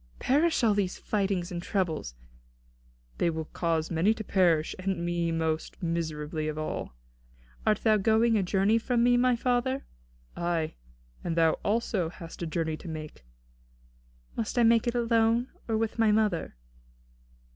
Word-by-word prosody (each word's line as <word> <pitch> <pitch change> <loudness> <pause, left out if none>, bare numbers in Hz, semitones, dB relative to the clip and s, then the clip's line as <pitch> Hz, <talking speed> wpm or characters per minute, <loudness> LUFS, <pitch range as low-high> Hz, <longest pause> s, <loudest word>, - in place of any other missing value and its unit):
"Perish 300 +2 +2
all 220 -2 +5
these 200 -3 -1
fightings 195 -3 -1
and 175 -1 -4
troubles!" 165 - -2 1.0
"They 170 - +3
will 160 -1 -3
cause 165 0 -1
many 175 +7 +2
to 220 - -5
perish, 175 -6 +2
and 185 -2 -2
me 170 -1 0
most 160 +1 -2
miserably 155 -2 -2
of 155 0 -3
all." 155 - -4 0.7
"Art 215 -1 +3
thou 215 -1 +5
going 220 +3 +3
a 210 - +3
journey 195 +4 +2
from 235 0 +1
me, 245 0 +5
my 250 0 +3
father?" 250 +2 0 0.5
"Ay, 170 -2 -1 0.5
and 165 - -2
thou 165 -1 +5
also 205 -5 0
hast 165 0 -10
a 170 - -2
journey 160 -1 -2
to 180 - -11
make." 155 - -8 1.1
"Must 230 +2 -3
I 240 - +5
make 230 0 +4
it 240 - 0
alone, 230 +1 +2 0.2
or 225 -1 +1
with 225 +1 -2
my 220 -1 +4
mother?" 210 - +1
190 Hz, 155 wpm, -28 LUFS, 165-225 Hz, 1.1 s, all